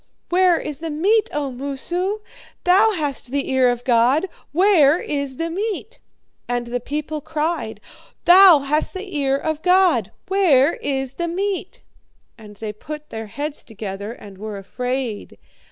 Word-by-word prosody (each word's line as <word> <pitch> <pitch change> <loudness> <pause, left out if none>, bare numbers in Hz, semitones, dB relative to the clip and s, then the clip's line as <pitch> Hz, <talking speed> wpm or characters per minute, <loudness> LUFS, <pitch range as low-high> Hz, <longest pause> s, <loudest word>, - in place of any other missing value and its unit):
Where 360 -1 +4
is 300 -2 -5
the 325 0 -4
meat, 410 +9 +2
O 285 -2 -2
Moosu? 345 +10 -3 0.4
Thou 400 +5 +5
hast 290 -7 -3
the 275 +1 -2
ear 260 -1 +4
of 245 0 -2
God. 250 +8 +3 0.2
Where 335 -4 +5
is 280 -5 -3
the 330 0 -2
meat?" 430 +5 -4 0.5
"'And 245 0 -1
the 245 +1 -3
people 300 +4 -4
cried, 315 +4 -3 0.5
"Thou 360 -4 +8
hast 300 +6 -1
the 375 -2 -6
ear 275 -1 +1
of 315 +1 -3
God. 360 - +3 0.2
Where 340 -7 +4
is 270 -1 -3
the 345 - -1
meat?" 385 +3 -3 0.5
And 210 -2 -13
they 210 0 -6
put 300 +7 -9
their 220 -1 -6
heads 290 +7 -5
together 205 -1 -6
and 200 -5 -12
were 215 -1 -6
afraid. 250 +2 -4
295 Hz, 150 wpm, -21 LUFS, 245-355 Hz, 0.5 s, Thou